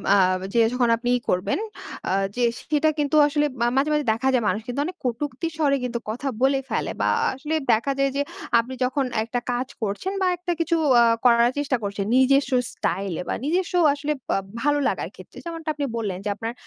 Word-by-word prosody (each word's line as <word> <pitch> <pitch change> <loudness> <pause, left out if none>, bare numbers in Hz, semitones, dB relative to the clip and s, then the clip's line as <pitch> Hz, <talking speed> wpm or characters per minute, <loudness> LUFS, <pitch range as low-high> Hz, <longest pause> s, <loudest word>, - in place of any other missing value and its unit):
আ - - +5 0.4
যে 235 - +3
যখন 245 -2 +2
আপনি 245 +1 -3
ই - - -5
করবেন, 180 - 0 0.5
আ - - +2 0.2
যে 245 - 0 0.3
সেটা 305 +1 +3
কিন্তু 295 +1 +1
আসলে 295 0 +1 0.2
আ - - +3
মাঝে, 285 +3 +2
মাঝে 300 -2 +1
দেখা 255 +4 -2
যায় 240 -3 +2
মানুষ 215 - 0 0.2
অনেক 365 +1 -6
কটুক্তির 280 +6 -2
স্বরে 280 -3 +2
কিন্তু 240 -1 -2
কথা 250 +5 -3
বলে 270 0 +3
ফেলে। - - -1
বা - - +2 0.2
আসলে 300 +4 -3 0.2
দেখা 235 +6 +1
যায় 275 0 +2
যে, 285 - +1 0.4
আপনি 250 +3 -3
যখন 260 +2 0 0.2
একটা 240 +2 -2
কাজ 250 +1 -1
করছেন, 215 - -2
বা 370 - +3
একটা 355 0 -3
কিছু 330 0 +1 0.3
আ - - +7 0.2
করার 235 0 +6
চেষ্টা 275 -3 0
করছেন 200 0 -3
নিজেস্ব 275 +1 +4 0.2
স্টাইলে 190 -3 -2
বা - - -1
নিজস্ব 360 +4 0 0.2
আসলে 290 +1 -3 0.2
বা - - +2 0.3
ভালো 290 0 +2
লাগার - - -2
ক্ষেত্রে, - - -14
যেমনটা 330 -2 -5
আপনি 290 -1 -2
বললেন 200 -5 -2
যে, 210 - 0
আপনার 225 +2 -4
270 Hz, 200 wpm, -24 LUFS, 235-295 Hz, 0.5 s, আ